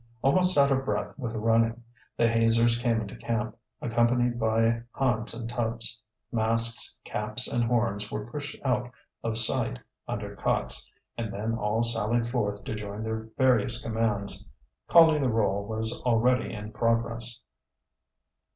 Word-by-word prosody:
Almost 180 +5 +3
out 140 0 +5
of 135 0 +1
breath - - -3
with 115 -4 -4
running, 115 +1 +1 0.3
the 115 - +3
hazers 115 +1 +3
came 115 -2 0
into 100 -2 -7
camp, 115 -1 -3 0.3
accompanied 120 +1 +1
by 115 +1 +1
Hans 120 -4 0
and 115 -1 -6
Tubbs. 115 -2 -2 0.3
Masks, 115 0 +2
caps, 110 +4 +5
and 120 - 0
horns 115 -3 0
were 105 - -4
pushed 145 +5 -6
out 125 -2 0 0.3
of 115 -1 0
sight 110 - +3 0.3
under - - -5
cots, - - -1 0.3
and 110 -3 -3
then 110 +3 -3
all 110 0 0
sallied 115 0 +1
forth 105 -5 -2
to - - -5
join 105 0 -6
their 110 0 -4
various 125 -2 +3
commands. 110 -3 -1 0.4
Calling 160 -3 +6
the 130 - +1
roll 100 -3 0
was 110 +1 -3
already 125 +1 +1
in 105 -1 -7
progress. 115 0 -1
115 Hz, 140 wpm, -27 LUFS, 110-120 Hz, 0.4 s, Calling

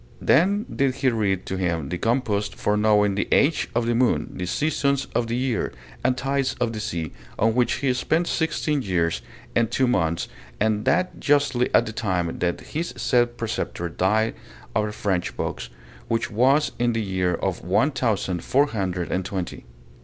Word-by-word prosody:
Then 200 +8 +3
did 135 -2 +1
he 130 - +2
read 100 -5 0
to 95 - -3
him 85 -6 -1
the 90 - -2
compost 115 -4 0
for 105 - 0
knowing 105 -1 +3
the 100 - -1
age 150 +3 +3
of 120 0 +2
the 120 - +1
moon, 120 +1 +1
the 90 - -4
seasons 140 - +1
of 120 -1 0
the 115 - -1
year, 125 -2 -1 0.3
and 125 +1 +2
tides 135 0 0
of 120 -2 0
the 110 - -4
sea, 85 -6 -3 0.3
on 110 +1 +3
which 120 -1 +2
he 130 -1 +1
spent 160 +7 +1
sixteen 160 -3 0
years 85 -6 0 0.3
and 115 -2 +3
two 130 +2 +2
months, 85 -9 +1 0.3
and 105 0 +1
that 180 +1 +1
justly 140 -4 +2
at 120 - +4
the 110 - -4
time 95 -8 -1
that 85 -1 -1
his 165 +3 -4
said 120 -1 +2
preceptor 95 -6 -3
died 105 +6 +1 0.4
of 105 0 +1
the - - -4
French 95 -4 -2
pox, - - -3 0.4
which 115 0 -1
was 135 +7 +3
in 120 -1 +2
the 115 -1 -1
year 90 -3 0 0.3
one 100 - +2
thousand 105 - -1
four 140 +2 +3
hundred 95 -8 -3
and 95 - 0
twenty. 90 -8 -5
115 Hz, 180 wpm, -24 LUFS, 95-130 Hz, 0.4 s, at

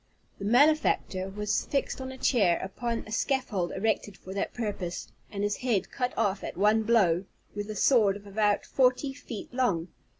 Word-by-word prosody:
The 200 - -5
malefactor 245 -6 +3
was 210 +1 -1
fixed 275 -1 -1
on 260 0 -5
a 260 - -9
chair 200 -11 +3
upon 230 +4 -3
a 215 - -11
scaffold 220 -7 0
erected 205 -1 -1
for 190 - -9
that 195 - -2
purpose, 200 -7 -4 0.2
and 200 -1 -3
his 205 0 0
head 235 -6 0
cut 250 -2 -1
off 195 0 0
at - - -6
one 210 +3 +4
blow, 200 -6 +3 0.3
with 205 +1 -5
a 215 - -4
sword 210 -4 +4
of 205 - -16
about 205 0 +1
forty 260 +1 +2
feet 250 -5 -8
long. 195 -10 0
210 Hz, 175 wpm, -28 LUFS, 195-250 Hz, 0.3 s, one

